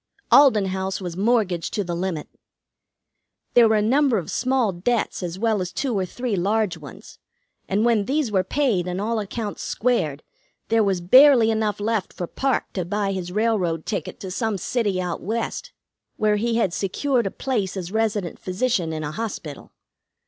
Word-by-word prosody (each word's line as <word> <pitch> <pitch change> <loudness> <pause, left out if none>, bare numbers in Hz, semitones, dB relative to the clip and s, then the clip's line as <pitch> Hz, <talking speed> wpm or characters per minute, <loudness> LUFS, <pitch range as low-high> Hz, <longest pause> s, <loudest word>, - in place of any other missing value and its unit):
Alden 255 -8 +6
House 190 0 -2
was 175 -3 -5
mortgaged 195 -4 0
to 205 - 0
the 175 -2 -4
limit. 170 -3 -3 1.3
There 235 -2 +6
were 220 - +3
a 210 - +2
number 265 +1 +3
of 175 - -4
small 255 -4 +1
debts 205 +7 -1
as 175 0 -4
well 220 -1 +1
as 180 -1 -4
two 265 -5 -2
or 190 -2 -1
three 245 +2 -3
large 200 +1 0
ones, 145 -6 -12 0.5
and 205 +4 +1
when 225 -4 +2
these 275 -1 0
were 190 -2 +2
paid 205 -5 0
and 180 +1 -3
all 220 +2 -1
accounts 210 +1 -5
squared 160 - -1 0.5
there 225 -1 +3
was 190 -3 0
barely 250 +4 +7
enough 215 -2 -1
left 215 -1 -1
for 175 - -4
Parke 270 +9 -1
to 185 - -2
buy 200 +3 -1
his 180 -2 -4
railroad 190 -6 0
ticket 210 - -4
to 190 - -6
some 220 +1 -1
city 205 -1 -1
out 180 -2 -3
West, 225 +4 -3 0.5
where 210 -1 +2
he 230 +2 0
had 200 -7 +1
secured 235 +5 0
a - - -1
place 205 -6 -2
as 180 -1 -5
resident 215 -4 -1
physician 185 -3 -1
in 155 -1 -4
a 150 - -3
hospital. 165 -6 -6
205 Hz, 180 wpm, -23 LUFS, 185-230 Hz, 1.3 s, barely